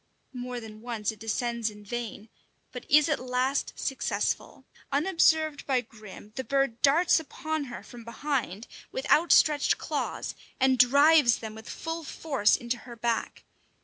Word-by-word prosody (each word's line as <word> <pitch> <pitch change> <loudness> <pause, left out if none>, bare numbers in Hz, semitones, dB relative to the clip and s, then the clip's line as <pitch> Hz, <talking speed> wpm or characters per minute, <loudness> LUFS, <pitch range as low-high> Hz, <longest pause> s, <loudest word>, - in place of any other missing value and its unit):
More 250 -1 -5
than 215 -2 -11
once 230 -3 -3
it 215 - -14
descends 230 +1 -1
in 210 -1 -13
vain, 225 -1 -5 0.4
but 250 - -9
is 300 +1 +6
at 300 - 0
last 255 +2 -1
successful. 270 - -2 0.3
Unobserved 315 -1 +2
by 260 -3 +2
Grim, 215 -2 -13
the 260 - -2
bird 275 -4 0
darts 330 +5 +4
upon 315 -1 -4
her 240 -2 -8
from 240 -1 -12
behind 235 -3 -3 0.3
with - - -4
outstretched 305 -2 +4
claws, - - -3 0.3
and 260 -1 +3
drives 280 +1 +6
them 220 -1 -7
with 220 +1 -11
full 325 0 -5
force 275 -7 +1
into 240 0 -3
her 240 -1 -11
back. 235 0 -2
250 Hz, 145 wpm, -28 LUFS, 230-290 Hz, 0.4 s, is